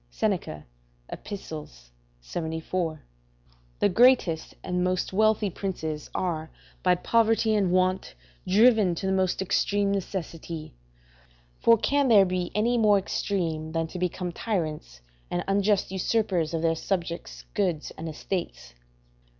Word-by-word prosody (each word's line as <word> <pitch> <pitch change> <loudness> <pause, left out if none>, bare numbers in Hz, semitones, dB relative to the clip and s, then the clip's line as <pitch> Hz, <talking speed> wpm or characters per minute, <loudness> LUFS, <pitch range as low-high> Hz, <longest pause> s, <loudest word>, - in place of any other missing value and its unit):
Seneca, 75 +5 -2 0.4
Ep., - - -9
74.] 155 - -6 0.7
The - - +3
greatest 200 -6 +3
and 180 -1 -1
most 185 0 -1
wealthy 215 0 +2
princes 160 -6 -4
are 160 -3 -2 0.3
by 180 -1 +4
poverty 225 +3 +2
and 200 -4 +2
want 185 +1 +1 0.3
driven 210 -2 +5
to 180 - -5
the 190 - +1
most 190 0 +1
extreme 200 +2 +1
necessity; 170 -4 -5 0.9
for 230 0 +5
can 280 +5 +2
there 210 -5 +7
be 180 -1 -2
any 235 +3 +2
more 210 -2 +5
extreme 165 -5 -2
than 165 0 0
to 180 - -6
become 180 0 -2
tyrants 155 - -3 0.3
and 175 0 -1
unjust 200 0 +2
usurpers 190 -4 0
of 165 - -2
their 165 -1 +3
subjects' 170 0 -4
goods 180 -7 -1
and 160 +1 -6
estates? 160 - -5
180 Hz, 125 wpm, -26 LUFS, 160-205 Hz, 0.9 s, there